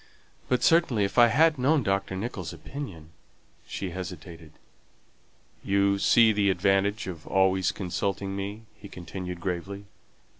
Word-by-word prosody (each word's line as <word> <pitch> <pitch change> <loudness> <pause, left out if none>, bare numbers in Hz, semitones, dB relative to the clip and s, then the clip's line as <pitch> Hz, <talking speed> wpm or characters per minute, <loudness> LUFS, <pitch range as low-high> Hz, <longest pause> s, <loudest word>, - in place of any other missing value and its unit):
"But, 125 -1 +1
certainly, 160 -11 +3
if 100 +5 0
I 120 - +8
had 155 +5 +3
known 140 +2 +2
Dr. 95 -1 -1
Nicholls' 110 +6 -5
opinion 90 - -8 0.3
" - - -35
she 95 -2 -5
hesitated. 85 -3 -8 1.1
"You 100 0 +2
see 115 +2 +5
the 100 -1 +2
advantage 95 +3 +1
of 85 -4 -8
always 95 -1 +2
consulting 95 +1 -3
me," 100 +3 -5
he 100 - -13
continued 90 0 -7
gravely. 95 +3 -4
100 Hz, 135 wpm, -27 LUFS, 95-110 Hz, 1.1 s, I